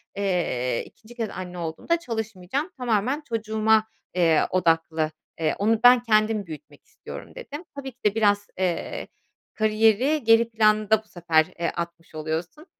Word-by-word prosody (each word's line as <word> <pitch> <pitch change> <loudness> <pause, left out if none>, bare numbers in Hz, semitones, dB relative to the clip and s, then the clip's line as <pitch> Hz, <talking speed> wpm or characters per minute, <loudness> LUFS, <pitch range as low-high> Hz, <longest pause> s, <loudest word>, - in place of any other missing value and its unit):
eee 175 -11 -1
2'nci 230 +2 -17
kez 225 -3 -3
anne 180 -1 -7
olduğumda 170 - -1
çalışmayacağım. 225 - -4
Tamamen 250 +4 0
çocuğuma, 220 -1 +2 0.3
eee, 165 -3 +4
odaklı, 165 -3 +1 0.3
eee, 160 -1 +1
onu 220 +2 +2
ben 245 -1 +7
kendim 215 -2 +2
büyütmek 155 -3 -11
istiyorum - - -11
dedim. 345 - -8
Tabii 270 -1 -6
ki 245 - -36
de 210 0 +3
biraz, 205 -2 +2
eee, 185 - -2 0.5
kariyeri 220 +7 +2
geri 225 +1 +5
planda 215 -1 +3
bu - - -29
sefer, 170 -4 +2
eee, 170 - 0
atmış 170 -1 -6
oluyorsun. 160 - -4
215 Hz, 140 wpm, -25 LUFS, 170-225 Hz, 0.5 s, ben